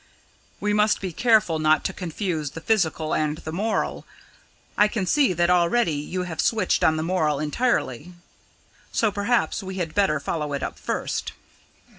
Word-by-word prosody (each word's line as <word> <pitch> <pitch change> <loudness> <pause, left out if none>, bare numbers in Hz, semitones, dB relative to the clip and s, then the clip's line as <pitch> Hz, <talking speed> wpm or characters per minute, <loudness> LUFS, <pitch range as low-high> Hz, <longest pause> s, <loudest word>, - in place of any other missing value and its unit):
"We 210 0 0
must 210 0 +3
be 185 -3 -5
careful 215 -7 +3
not 155 0 +3
to - - -1
confuse 165 -3 -3
the 165 - -8
physical 165 -5 0
and 155 0 0
the 155 - -7
moral. 210 +6 -2 0.7
I 210 - +5
can 210 -2 -2
see 270 +4 +3
that 175 +1 +2
already 175 +2 +3
you 150 +5 -3
have 170 -3 -3
switched 220 -5 +1
on 160 0 +4
the 155 - -1
moral 160 -5 0
entirely, 155 - -1 0.8
so 220 -2 +1
perhaps 215 +4 0
we 190 -1 -6
had 170 -4 -3
better 190 -7 +2
follow 150 0 -3
it 140 - -3
up - - -5
first. - - -3
180 Hz, 165 wpm, -24 LUFS, 155-210 Hz, 0.8 s, I